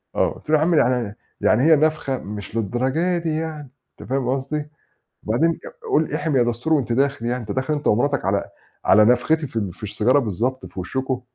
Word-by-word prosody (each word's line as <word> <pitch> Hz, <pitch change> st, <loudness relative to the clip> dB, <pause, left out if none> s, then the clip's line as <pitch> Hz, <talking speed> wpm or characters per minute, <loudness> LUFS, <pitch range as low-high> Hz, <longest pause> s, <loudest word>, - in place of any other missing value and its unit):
آه. -, -, -2 dB
آه. -, -, +2 dB
قُلت -, -, -16 dB
له: 155 Hz, -, +5 dB
"يا -, -, -1 dB
عم 170 Hz, +2 st, +2 dB
يعني 125 Hz, -7 st, +1 dB, 0.3 s
يعني 110 Hz, +4 st, +3 dB
هي 160 Hz, +1 st, +7 dB
نَفخَة 155 Hz, -3 st, +1 dB
مش 105 Hz, 0 st, -8 dB
للدرجة 130 Hz, -, 0 dB
دي 170 Hz, -1 st, -2 dB
يعني." 155 Hz, -4 st, -5 dB, 0.3 s
أنت -, -, -11 dB
فاهم 130 Hz, -2 st, 0 dB
قصدي، 140 Hz, +3 st, -2 dB, 0.5 s
"بعدين 120 Hz, +10 st, +2 dB
آآ 165 Hz, -, -7 dB
قُل 155 Hz, 0 st, +2 dB
إحِم 155 Hz, -1 st, -1 dB
يا 125 Hz, -, +5 dB
دَستور 120 Hz, +6 st, -1 dB
وأنت 125 Hz, -6 st, +1 dB
داخِل 135 Hz, 0 st, 0 dB
يعني، 120 Hz, +1 st, 0 dB
أنت 105 Hz, -3 st, -6 dB
داخِل 130 Hz, +6 st, -1 dB
أنت 145 Hz, -1 st, -2 dB
أمرتك 140 Hz, +2 st, +1 dB
على 100 Hz, +1 st, +1 dB, 0.4 s
على 105 Hz, +2 st, +6 dB
نَفختي 145 Hz, +7 st, +2 dB
في 125 Hz, -, -18 dB
ال 100 Hz, -5 st, -2 dB
في 100 Hz, -, -18 dB
السيجارة 105 Hz, +6 st, +2 dB
بالضبط 125 Hz, +3 st, -2 dB
في -, -, -9 dB
وشُّكم." 130 Hz, +7 st, -2 dB
130 Hz, 210 wpm, -22 LUFS, 115-150 Hz, 0.5 s, هي